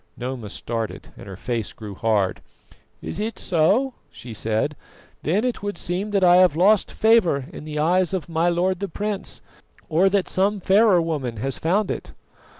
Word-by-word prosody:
Noma 125 -3 -5
started, 115 +1 -5
and - - -12
her 95 - -7
face 115 0 -3
grew 105 -2 -8
hard. 105 -2 0 0.6
"Is - - -5
it 220 +2 -3
so?" 200 +11 +2 0.2
she 120 -2 -10
said. 110 +7 -1 0.5
"Then 190 +8 +1
it 250 -1 -2
would 205 0 -4
seem 185 +4 -3
that 200 -2 +1
I 175 0 +7
have 180 -5 +5
lost 195 +4 +3
favour 205 - +3
in - - -9
the 150 -1 -5
eyes 175 +4 +2
of 190 -4 -3
my 165 +1 +1
lord 180 +1 0
the 200 - -2
prince, 205 +2 -5 0.5
or 175 +4 +4
that 195 -1 +1
some 200 +2 +1
fairer 195 -1 +4
woman 140 -8 -3
has 135 +4 -2
found 190 +5 +1
it." - - -6
175 Hz, 175 wpm, -23 LUFS, 130-200 Hz, 0.6 s, I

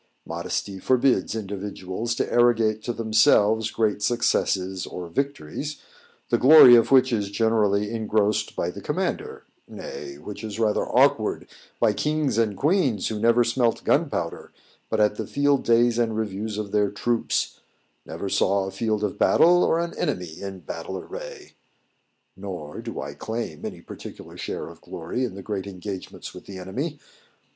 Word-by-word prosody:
Modesty 90 +3 -4
forbids 125 -2 +2
individuals 100 +1 -4
to - - -2
arrogate 115 -3 +3
to 120 - -1
themselves 110 -1 +3
great 110 -2 0
successes 95 -4 0
or 90 -1 -6
victories, 140 - -3 0.5
the - - +2
glory 135 -2 +9
of 115 - +4
which 130 -1 +5
is 100 -3 -1
generally 105 -1 +1
engrossed 110 -1 0
by 85 - -1
the 100 - -9
commander 190 - -3 0.2
nay, 450 -8 -8
which - - -9
is 110 0 -5
rather 110 -2 +1
awkward, - - +2 0.3
by - - +3
kings 150 -6 0
and 105 -4 +1
queens 145 - +1
who 110 -1 -3
never 115 +2 +4
smelt 120 0 0
gunpowder - - -1 0.4
but 110 - 0
at 105 0 +3
the - - -4
field 140 -1 +2
days 120 0 +3
and 115 -2 0
reviews 105 0 -3
of 105 -2 -4
their 105 -1 +2
troops; 115 +3 -1 0.4
never 85 +5 -6
saw 95 0 +1
a 95 - -5
field 110 -1 -1
of 105 - -2
battle, 175 +1 +5
or 165 - +2
an 170 0 -2
enemy 90 -3 -3
in 95 -2 -6
battle 85 +4 -6
array. 475 -3 -9 0.8
Nor 90 -7 -7
do - - -6
I - - -5
claim 110 -9 -5
any - - -6
particular - - -10
share - - -5
of - - -13
glory 85 +10 -4
in 115 - -6
the 100 - -8
great 100 -1 -4
engagements 95 0 -7
with - - -12
the 100 - -8
enemy. 130 - -4
110 Hz, 155 wpm, -24 LUFS, 100-120 Hz, 0.8 s, glory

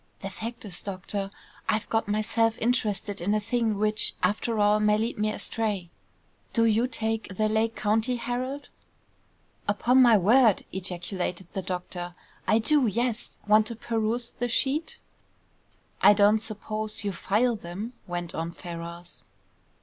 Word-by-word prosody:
"The 195 - -5
fact 230 +4 -6
is, 185 -4 0
doctor, 195 0 -3 0.4
I've 215 0 +1
got 225 -1 +1
myself 225 +2 +1
interested 210 -5 0
in 205 +4 +1
a - - +2
thing 225 -1 0
which, 215 +1 +1
after 215 +4 +1
all, 210 0 +4
may 210 0 +3
lead 225 0 -2
me 215 0 +1
astray. 210 -6 -2 0.6
Do 230 -1 +3
you 225 +2 +3
take 225 -4 -2
the 215 - +2
Lake 220 +1 +1
County 220 +4 +1
Herald?" 255 +4 -4 1.0
"Upon 240 +5 +4
my 235 -3 +7
word!" 220 +2 +4
ejaculated 180 0 -3
the 190 - -2
doctor. 180 -1 -5 0.3
"I 215 - +5
do; 270 +3 +4
yes. 235 +2 -1
Want 215 +1 +5
to 230 - -5
peruse 230 +1 -1
the 245 0 -3
sheet?" 280 +7 0 1.0
"I - - +8
don't 205 +1 +5
suppose 215 0 -4
you 200 - -1
file 220 +6 +1
them?" 205 +5 -6
went 175 -1 -4
on 165 +1 -3
Ferrars. 170 0 -7
215 Hz, 145 wpm, -27 LUFS, 195-230 Hz, 1.0 s, I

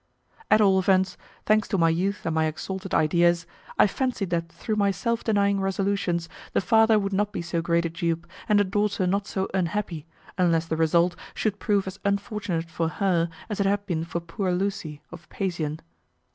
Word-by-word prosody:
At 215 - +6
all 195 -2 +5
events, 190 -1 +2 0.3
thanks 215 -1 +3
to 195 - 0
my 165 -2 +4
youth 190 +5 -1
and 165 - 0
my 160 0 +2
exalted 190 +5 -4
ideas, 170 +2 +3 0.3
I - - +7
fancied 215 -4 -1
that 165 -1 -1
through 190 +6 -3
my 200 -1 +3
self 230 +4 -1
denying 200 -2 +2
resolutions 195 -3 0 0.3
the - - +3
father 220 +1 +4
would 200 -1 -1
not 205 +1 +1
be 170 - -4
so 170 -1 -1
great 170 0 +1
a - - 0
dupe, 170 0 -2 0.2
and 210 -1 +5
the - - +5
daughter 200 0 0
not 200 +2 0
so 190 -1 -2
unhappy, 175 -3 -2 0.3
unless 165 -2 +3
the 165 - -2
result 170 +2 +3 0.2
should 205 -2 -1
prove 205 -3 +1
as 190 +1 -7
unfortunate 200 -4 -1
for 165 0 -1
her 170 -1 +1 0.2
as 210 -2 -4
it 200 - +2
had 200 +1 0
been 170 -5 -1
for 170 0 -3
poor 170 +3 -3
Lucy, 180 -5 -2
of 175 -1 -12
Pasean. 165 -6 -3
190 Hz, 190 wpm, -25 LUFS, 170-200 Hz, 0.3 s, I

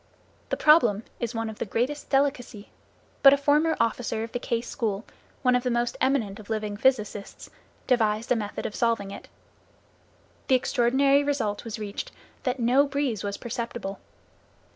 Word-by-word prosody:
The - - -1
problem 240 -10 +5 0.2
is 235 0 -3
one 225 0 -2
of 220 -1 -8
the - - 0
greatest 250 +8 -2
delicacy, 270 -6 -1 0.5
but 275 -1 +9
a - - +4
former 300 +3 +2
officer 225 -1 0
of 225 - -7
the 245 - -3
Case 235 -1 -2
School, 215 -3 -2 0.4
one 250 -1 +4
of 250 - +2
the 250 - -1
most 240 0 0
eminent 230 -7 +1
of 215 - -13
living 215 -2 -2
physicists, 210 -4 -1 0.3
devised 225 -2 +1
a - - +5
method 210 -2 -4
of - - -3
solving 230 -4 0
it. - - -9 1.2
The 265 - +5
extraordinary 270 +3 +3
result 240 -8 -1
was 230 -2 -5
reached 215 - -5 0.3
that 255 -1 -2
no 255 +5 +4
breeze 275 -7 -1
was 200 0 -3
perceptible. 235 -4 -5
235 Hz, 165 wpm, -26 LUFS, 215-270 Hz, 1.2 s, but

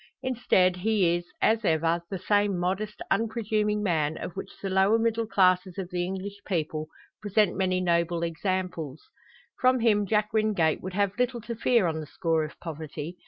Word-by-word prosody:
Instead, 190 -8 +2
he 185 -3 +2
is, 175 0 -5 0.2
as 225 +1 +3
ever, 165 -1 +2
the 195 - -3
same 205 +1 +1
modest, 195 +4 -2
unpresuming 215 -1 0
man, 160 -5 0
of - - -6
which 195 - -6
the 195 - -4
lower 190 +3 +3
middle 230 0 0
classes 185 -3 +2
of 190 -2 -5
the 175 -1 -1
English 190 +2 -5
people 155 -4 -2 0.3
present 210 -1 +2
many 185 -1 +1
noble 170 -1 +1
examples. 170 -4 -3 0.6
From 255 0 +4
him 210 -3 +3
Jack 210 +1 +1
Wingate 210 -8 +2
would 185 0 -6
have 200 +2 0
little 250 -1 +1
to 235 +2 -5
fear 235 -2 +3
on 160 -2 -1
the 155 - -7
score 165 +1 0
of 155 - -8
poverty. 160 +1 -7
190 Hz, 170 wpm, -27 LUFS, 170-210 Hz, 0.6 s, From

